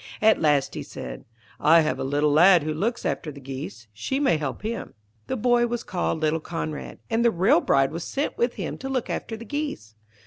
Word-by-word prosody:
At 220 0 +4
last 145 -3 +2
he - - -4
said, - - -8 0.3
'I 165 +2 +6
have 155 - -1
a - - -1
little 145 +2 +1
lad 175 +2 +6
who 155 0 -2
looks 225 +10 -2
after 155 - -2
the 140 - -11
geese; 130 -3 -7
she 115 - -2
may 270 - +3
help 145 +3 -4
him.' 230 +2 -4 0.3
The 260 - -2
boy 240 +1 +3
was 240 0 -3
called 175 -3 -2
little 155 +1 +1
Conrad, 155 -2 -5
and 225 +1 +2
the 235 - +6
real 180 -3 +3
bride 135 0 +3
was 165 +2 -4
sent 280 +2 -2
with 240 +1 0
him - - -5
to 270 - -5
look 260 -3 -2
after 225 - -4
the 230 - -9
geese. 290 - -4
170 Hz, 215 wpm, -25 LUFS, 150-235 Hz, 0.3 s, I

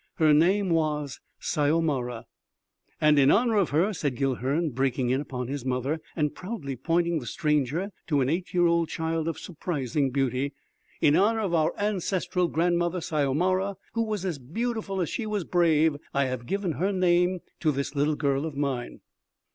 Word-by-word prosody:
Her 155 -2 +4
name 185 +5 +3
was 150 -4 0 0.2
Syomara." 145 -6 0 0.7
"And 150 -1 +5
in 135 0 +5
honor 230 +3 +3
of 195 -5 +2
her," 175 +9 +2
said 145 -7 -2
Guilhern 135 +4 0
breaking 130 0 0
in 130 +2 +1
upon 125 -4 -5
his 140 -1 -4
mother 130 +5 -1
and 150 -3 0
proudly 180 - -5
pointing 170 +4 +1
the 120 - -9
stranger 150 - 0 0.2
to 145 -4 +2
an 130 - +1
eight 175 +5 -1
year 175 -1 +3
old 170 -1 +2
child 160 0 -2
of 165 -2 -2
surprising 150 -5 -2
beauty, 135 +1 -1 0.5
"in 145 - +5
honor 220 +3 +3
of 195 -5 -1
our 160 0 +2
ancestral 190 -3 0
grandmother 175 +2 +1
Syomara, 175 +6 0 0.2
who 230 - 0
was 210 -4 -3
as 170 -6 -2
beautiful 205 - -3
as 170 - -1
she 230 -4 -3
was 210 -3 -1
brave, 160 -3 +3 0.2
I 140 0 +3
have 130 -2 -4
given 195 -3 -1
her 180 +7 0
name 180 -1 +2 0.2
to 155 -3 +2
this 140 0 -3
little 150 +1 +1
girl 140 0 0
of 145 -3 -7
mine." 135 -4 -3
160 Hz, 170 wpm, -27 LUFS, 140-180 Hz, 0.7 s, And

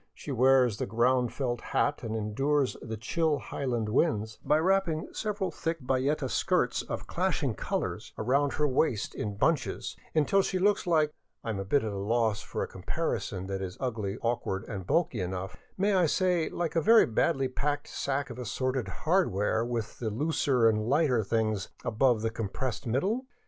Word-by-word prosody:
She 145 - -7
wears 130 -3 +4
the - - -2
round 120 +3 +2
felt 120 -4 -2
hat 145 - 0
and 110 -2 -4
endures 135 +6 0
the 110 -2 -5
chill 155 +7 0
highland 120 -6 -2
winds 110 -2 0
by 150 - +3
wrapping 170 -2 +1
several 210 -3 -2
thick 165 0 -3
bayeta 135 +2 0
skirts - - +1
of - - -5
clashing - - 0
colors - - -3
around 140 +5 +1
her 150 - +1
waist 130 -5 0
in 105 -1 -4
bunches, 155 +5 0 0.2
until 160 +6 +4
she 190 - -1
looks 200 0 +2
like 155 -3 +3
— - - -51
I 115 - -2
am 100 - -3
at 100 +8 +1
a 105 -2 -3
loss 110 +1 +1
for - - -4
a - - -3
com - - -11
parison 95 0 -2
that 95 0 -3
is 95 -1 -5
ugly, 110 -5 -2
awkward, 115 -5 -1
and 95 -5 -6
bulky 155 - +1
enough; 95 +1 -4
— - - -36
may 200 +2 +2
I 180 -3 +4
say, 180 0 +1
like 170 -2 -3
a 165 - +3
very 225 +7 +7
badly 135 +4 +1
packed 145 +3 -2
sack 140 -1 -2
of 120 - -8
assorted 130 +1 -2
hardware 115 - +1
with 115 -2 -4
the 115 - -1
looser 130 -1 +2
and 110 0 +1
lighter 135 -5 +3
things 110 -2 0 0.2
above 115 0 +2
the 115 - 0
compressed 115 +3 -3
middle? 200 - 0
130 Hz, 180 wpm, -29 LUFS, 110-155 Hz, 0.2 s, very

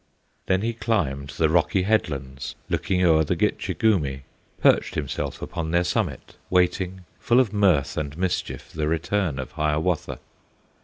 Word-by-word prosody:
Then 95 +1 +2
he 115 +1 0
climbed 75 - -1
the 80 - +4
rocky 85 +4 +2
headlands, 70 - -1
Looking 90 -1 0
o'er 80 -2 +5
the - - 0
Gitche - - -1
Gumee, 75 -12 +1 0.4
Perched - - +3
himself 70 -3 -3
upon 80 -1 -4
their 85 +2 +2
summit, - - -2
Waiting 90 +1 +1 0.2
full 120 +2 +3
of 115 -6 +2
mirth 90 -10 +2
and 75 -2 -3
mischief 90 0 -2
The 75 -1 -1
return 80 0 0
of 65 - -5
Hiawatha. 75 +2 -1
85 Hz, 145 wpm, -24 LUFS, 75-95 Hz, 0.4 s, o'er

